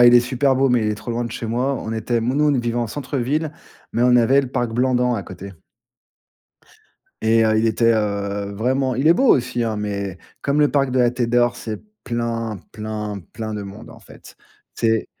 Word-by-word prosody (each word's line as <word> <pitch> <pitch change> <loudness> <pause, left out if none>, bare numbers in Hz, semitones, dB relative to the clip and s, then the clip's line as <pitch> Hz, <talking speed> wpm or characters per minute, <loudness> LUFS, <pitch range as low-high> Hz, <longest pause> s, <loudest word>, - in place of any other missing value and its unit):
Ouais, 120 - +9
il 120 - +6
est 120 - +8
super 130 +2 +1
beau, 135 -1 +3
mais 120 -2 +3
il 105 0 0
est - - -1
trop 120 - -7
loin 120 +1 -1
de 115 - -5
chez 115 - -6
moi. 125 +5 0
On 115 -3 -4
était 115 +2 -1
mou 125 +4 -1
nous 150 +1 +2
on - - 0
vivait 120 -1 -1
en 120 - 0
centre-ville, 145 +5 -2 0.4
mais 120 - +1
on 125 0 +5
avait 130 +4 +5
le 130 - -5
parc 120 -3 -1
Blandan 125 0 +2
à 100 - -3
côté 95 +2 -9 1.7
et 115 0 +4
heu, 110 0 +3
il 115 - +2
était, 115 +1 +3
heu, 100 -1 -2
vraiment 130 +4 0
il 135 +5 0
est 165 - +8
beau 265 +8 +2
aussi 120 -1 -1
hein, 110 -2 -2
mais 100 -3 -3 0.2
comme 140 +1 +1
le 145 - +4
parc 135 -2 +1
de 130 - 0
la 120 -1 +4
Tête 120 -2 -2
d'Or, 120 0 +3
c'est 110 -2 -6 0.2
plein, 115 -4 -3
plein, 105 -2 -5
plein 110 -1 -5
de 105 - -4
monde 100 +4 -10
en - - -14
fait. - - -15 0.4
C'est 110 -1 +1
120 Hz, 225 wpm, -21 LUFS, 110-125 Hz, 1.7 s, Ouais